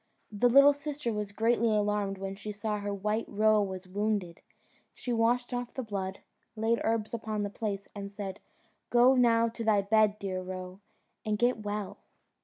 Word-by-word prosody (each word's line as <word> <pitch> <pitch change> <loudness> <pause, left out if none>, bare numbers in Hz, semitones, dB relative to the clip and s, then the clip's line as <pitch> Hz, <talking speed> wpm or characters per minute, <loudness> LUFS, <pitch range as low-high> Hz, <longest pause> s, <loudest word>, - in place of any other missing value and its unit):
The 215 +4 +3
little 275 +3 +7
sister 285 -4 -4
was 210 -1 -3
greatly 230 +2 +2
alarmed 210 -2 0
when 195 0 -4
she 210 +2 -7
saw 210 0 -3
her 205 0 -3
white 210 +3 -1
roe 215 +1 +3
was 190 -2 -4
wounded; 200 -3 -2 0.5
she 245 - -3
washed 240 +2 +1
off 245 0 -4
the 260 - -3
blood, 190 -3 -4 0.3
laid 225 +1 +1
herbs 225 -1 -1
upon 220 -2 -2
the 205 - -3
place, 200 -2 -4
and 200 -1 -6
said, 200 -1 -6 0.5
"Go 245 +2 +6
now 230 -2 +4
to 230 0 -6
thy 210 -3 +3
bed, 215 0 +3
dear 190 -3 -3
Roe, 185 0 -7 0.4
and 215 -1 -1
get 240 0 +1
well." 210 -1 -4
210 Hz, 175 wpm, -30 LUFS, 200-230 Hz, 0.5 s, little